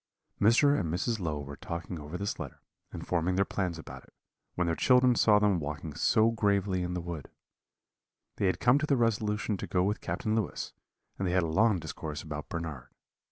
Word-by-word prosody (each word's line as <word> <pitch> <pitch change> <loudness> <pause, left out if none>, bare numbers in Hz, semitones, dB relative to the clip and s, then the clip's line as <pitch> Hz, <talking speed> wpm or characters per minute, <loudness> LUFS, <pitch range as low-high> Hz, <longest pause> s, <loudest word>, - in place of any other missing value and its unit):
"Mr. 135 +7 +5
and 80 -4 -2
Mrs. 110 +6 -1
Low 80 -5 -2
were 70 0 -7
talking 85 +2 -6
over 75 +4 -6
this 100 +2 -3
letter, - - -7 0.3
and - - -7
forming 90 +1 0
their 100 +1 +3
plans 90 -4 -2
about 80 - -9
it, - - -24 0.4
when 90 - +1
their 85 -1 0
children 125 +3 +5
saw 110 -2 +5
them 105 -4 +3
walking 75 +1 -5
so 110 +9 +3
gravely 100 -4 +1
in 90 0 -2
the 90 - -2
wood. 85 -4 -6 1.1
They 100 - +1
had 95 - 0
come 125 +4 +4
to 155 - -1
the 140 - +3
resolution 105 -2 0
to - - -5
go 90 -1 +1
with 105 +3 -1
Captain 110 -2 -2
Lewis, 110 -5 -2 0.5
and 95 - 0
they 90 - 0
had 90 -1 +3
a - - -1
long 100 +5 +3
discourse 80 -2 -6
about 75 -1 -6
Bernard. 80 -7 -5
95 Hz, 205 wpm, -30 LUFS, 85-110 Hz, 1.1 s, Mr